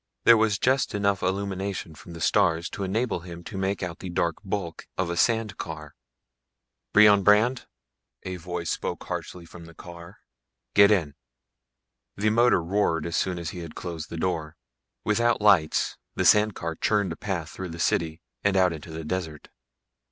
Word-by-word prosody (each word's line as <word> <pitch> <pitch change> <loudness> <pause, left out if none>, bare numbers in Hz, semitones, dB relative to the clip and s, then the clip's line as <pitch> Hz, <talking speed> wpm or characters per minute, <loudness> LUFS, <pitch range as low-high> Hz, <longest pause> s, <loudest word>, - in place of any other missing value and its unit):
There 115 - +8
was 110 -2 +2
just 130 +1 +1
enough 100 -1 +1
illumination 95 -2 -3
from 85 +2 -12
the 85 - -9
stars 85 -5 +2
to 100 - -5
enable 105 +1 -1
him 85 0 -10
to 100 - -9
make 95 0 -2
out 85 -2 -5
the 95 - -6
dark 85 -1 0
bulk 95 -4 -4
of 90 -2 -1
a - - -2
sand 110 +1 +1
car. 75 -2 -7 1.0
"Brion 105 -1 +7
Brandd?" 110 +6 +3 0.6
a 95 0 -5
voice 85 -1 -4
spoke - - -4
harshly 90 -2 -6
from 85 +1 -12
the 85 0 -14
car. 85 -1 -11 0.6
"Get 100 -1 +7
in." 85 -9 +1 1.0
The 105 +2 +2
motor 120 -5 +4
roared 85 -3 0
as 85 0 -3
soon 90 -2 0
as 85 -2 -4
he 90 - -8
had 85 -2 -8
closed 85 -3 -6
the 85 - -6
door. 80 -3 -2 0.5
Without 115 +2 +2
lights 100 -7 +3 0.2
the - - 0
sand 105 -1 +5
car 85 -1 -4
churned 100 +2 0
a - - -4
path 85 -4 -4
through 95 -1 -6
the 85 - -7
city 80 -1 -1 0.2
and 100 -1 +2
out 90 -2 +4
into 80 +1 -9
the 80 0 -6
desert. 80 -3 -4
90 Hz, 175 wpm, -26 LUFS, 85-100 Hz, 1.0 s, There